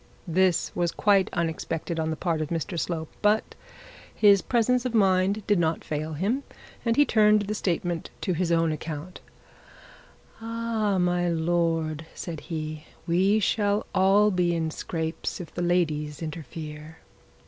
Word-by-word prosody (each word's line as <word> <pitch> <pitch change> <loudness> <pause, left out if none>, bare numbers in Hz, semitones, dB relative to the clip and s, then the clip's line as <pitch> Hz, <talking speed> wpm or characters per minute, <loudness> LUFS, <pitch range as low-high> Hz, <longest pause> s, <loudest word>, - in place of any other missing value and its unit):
This 180 +1 +1
was 175 -1 +1
quite 200 -2 +3
unexpected 165 -1 -2
on 160 0 0
the 160 - -1
part 165 -1 -1
of 155 - -2
Mr 170 +1 -2
Slope, 160 -3 -3
but 210 +1 +2 0.6
his 200 -3 +6
presence 245 +1 +1
of 250 -2 -2
mind 195 0 +2
did 205 -3 +2
not 160 -1 0
fail 155 +1 -3
him, 205 - 0 0.4
and 230 -1 +1
he 290 - +5
turned 210 -3 +4
the 205 +1 -3
statement 175 -4 -2
to 185 - 0
his 175 0 -1
own 165 -1 +3
account. 155 +3 -6 1.2
'Ah, 225 -3 -1
my 175 -1 +1
lord,' 165 -2 0
said 165 -3 -5
he, 155 -1 -4 0.2
'we 190 +5 +3
shall 205 0 +1
all 195 +2 +4
be 175 -2 +1
in 160 -1 -1
scrapes 160 +2 -4
if 175 - -8
the - - -3
ladies 155 -4 0
interfere.' 155 0 -7
175 Hz, 150 wpm, -26 LUFS, 160-205 Hz, 1.2 s, his